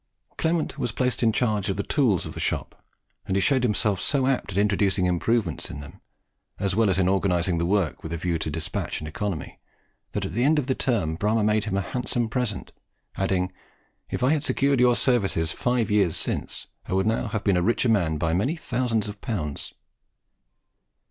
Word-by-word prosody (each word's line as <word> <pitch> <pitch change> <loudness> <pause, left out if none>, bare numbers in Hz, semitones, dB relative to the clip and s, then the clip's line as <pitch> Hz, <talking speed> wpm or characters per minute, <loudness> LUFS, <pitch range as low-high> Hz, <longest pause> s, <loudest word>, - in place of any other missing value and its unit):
Clement 160 -2 -1
was 120 -3 -1
placed 125 +1 0
in 115 -2 +4
charge 105 -3 0
of 95 - -1
the 100 - -1
tools 120 - +2
of - - -6
the - - -7
shop, - - -3 0.4
and 95 - 0
he - - +3
showed 130 +7 +3
himself 105 -4 +1
so 140 -3 +1
apt 130 -6 0
at 95 - -4
introducing 100 -2 +2
improvements 90 +1 0
in - - -7
them, 70 0 -11 0.6
as 100 -1 -1
well 110 -2 +3
as 95 - +2
in 95 -2 +3
organizing 90 -2 +1
the 85 - 0
work 95 -4 0
with 80 - -7
a 85 - -2
view 85 0 -1
to 80 - -2
despatch 80 +1 -3
and 75 - -6
economy, 90 +1 -4 0.5
that - - -1
at - - -5
the 120 - +1
end 150 +3 +4
of 145 - +1
the 130 - +1
term 100 -13 0
Bramah 105 +3 +1
made 105 -1 +2
him 100 -3 -1
a - - +1
handsome 120 +2 -1
present, 115 -6 -2 0.4
adding, 95 -1 0 0.6
"if - - -3
I 130 - +4
had 155 -2 +1
secured 140 -1 +2
your 125 -1 +5
services 100 - +2
five 120 -1 0
years 100 -6 +3
since, - - -2 0.2
I - - -3
would 95 0 +2
now 115 +2 0
have 105 -1 -3
been 100 - +3
a 90 - +2
richer 115 +5 +2
man 85 -8 +2
by 80 +1 0
many 125 - +1
thousands 120 -7 -1
of 105 -1 -8
pounds." 80 - -4
105 Hz, 205 wpm, -25 LUFS, 90-120 Hz, 0.6 s, your